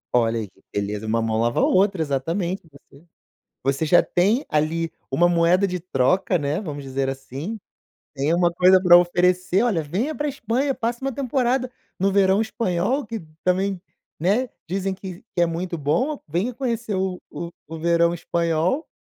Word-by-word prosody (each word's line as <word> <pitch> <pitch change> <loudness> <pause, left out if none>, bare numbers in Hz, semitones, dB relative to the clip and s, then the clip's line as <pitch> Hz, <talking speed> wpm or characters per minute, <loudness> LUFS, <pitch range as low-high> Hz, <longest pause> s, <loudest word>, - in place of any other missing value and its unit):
Olha 115 -1 +2
aí 110 - -4
que 95 - -27
beleza, 105 +1 -3
uma 115 +1 +1
mão 110 0 0
lava 120 0 +1
a - - +3
outra, 195 0 +3
exatamente. 165 +6 -1
E - - -21 0.2
você, 140 +3 -17 0.6
você 135 +4 0
já 175 +3 +6
tem 210 +10 +1
ali 160 +2 0 0.2
uma 175 +6 +3
moeda 175 +3 +3
de 180 -2 -1
troca, 180 +3 +1
né, 150 +2 -1
vamos 150 -8 -6
dizer 135 0 -2
assim. 135 - -5 0.6
Tem 145 +4 +1
uma 175 0 +2
coisa 185 +2 +6
pra 175 -1 +8
oferecer, 180 +2 +2
"Olha, 200 -10 +1
venha 200 - -2
pra 295 0 -2
Espanha, 265 +1 -1
passa 235 0 -2
uma 270 - 0
temporada 255 -1 0 0.3
no 195 +1 +2
verão 195 +1 +4
espanhol 220 +4 -1
que 225 +1 -4 0.2
também, 190 +1 0 0.4
né, 215 +9 +1 0.2
dizem 195 +2 -1
que 185 -2 -9
que - - 0
é 175 - +5
muito 170 +1 -3
bom, 170 - 0
venha 180 +11 -1
conhecer 235 -4 -2
o 185 -1 -1
o 170 - -5 0.2
o 160 +1 -7
verão 170 +1 +3
espanhol". 170 - 0
180 Hz, 175 wpm, -23 LUFS, 155-205 Hz, 0.6 s, pra